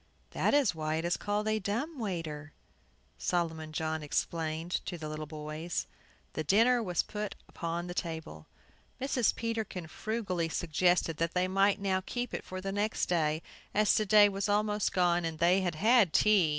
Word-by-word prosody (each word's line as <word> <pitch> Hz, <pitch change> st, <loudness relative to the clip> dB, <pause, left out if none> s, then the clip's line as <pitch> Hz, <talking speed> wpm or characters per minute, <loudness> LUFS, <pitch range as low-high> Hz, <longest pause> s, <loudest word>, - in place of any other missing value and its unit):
"That -, -, +2 dB
is 275 Hz, -10 st, +4 dB
why 155 Hz, -1 st, -2 dB
it 165 Hz, +1 st, -2 dB
is 175 Hz, -, +1 dB
called 210 Hz, +1 st, -1 dB
a 215 Hz, 0 st, +1 dB
dumb 240 Hz, -, -3 dB
waiter," 160 Hz, -7 st, -4 dB, 0.7 s
Solomon 160 Hz, -3 st, -1 dB
John 160 Hz, 0 st, -2 dB
explained 160 Hz, +2 st, -2 dB
to 175 Hz, -, -3 dB
the 155 Hz, -2 st, -6 dB
little 155 Hz, 0 st, -5 dB
boys. 155 Hz, +2 st, -4 dB, 0.5 s
The 155 Hz, -, -2 dB
dinner 230 Hz, -, +4 dB
was 180 Hz, -6 st, 0 dB
put 210 Hz, -1 st, -5 dB
upon 170 Hz, 0 st, -4 dB
the 175 Hz, -, -5 dB
table. 160 Hz, -, -5 dB, 0.5 s
Mrs. 260 Hz, -3 st, +1 dB
Peterkin 220 Hz, -6 st, -3 dB
frugally 185 Hz, -2 st, -2 dB
suggested 175 Hz, 0 st, +1 dB
that 165 Hz, +1 st, -1 dB
they 180 Hz, 0 st, +2 dB
might 195 Hz, +2 st, +3 dB
now 190 Hz, -1 st, 0 dB
keep 245 Hz, +4 st, -4 dB
it -, -, -3 dB
for 185 Hz, 0 st, -6 dB
the 195 Hz, +1 st, -3 dB
next 205 Hz, +2 st, 0 dB
day, 155 Hz, -2 st, +1 dB, 0.3 s
as 210 Hz, 0 st, +4 dB
to 215 Hz, -, +2 dB
day 210 Hz, +1 st, +7 dB
was 200 Hz, 0 st, -2 dB
almost 210 Hz, 0 st, +1 dB
gone, 175 Hz, -1 st, +2 dB
and 165 Hz, -1 st, -3 dB
they 175 Hz, +4 st, +4 dB
had 175 Hz, -3 st, -1 dB
had 215 Hz, -1 st, +4 dB
tea. 205 Hz, -6 st, +5 dB
180 Hz, 175 wpm, -31 LUFS, 160-210 Hz, 0.7 s, day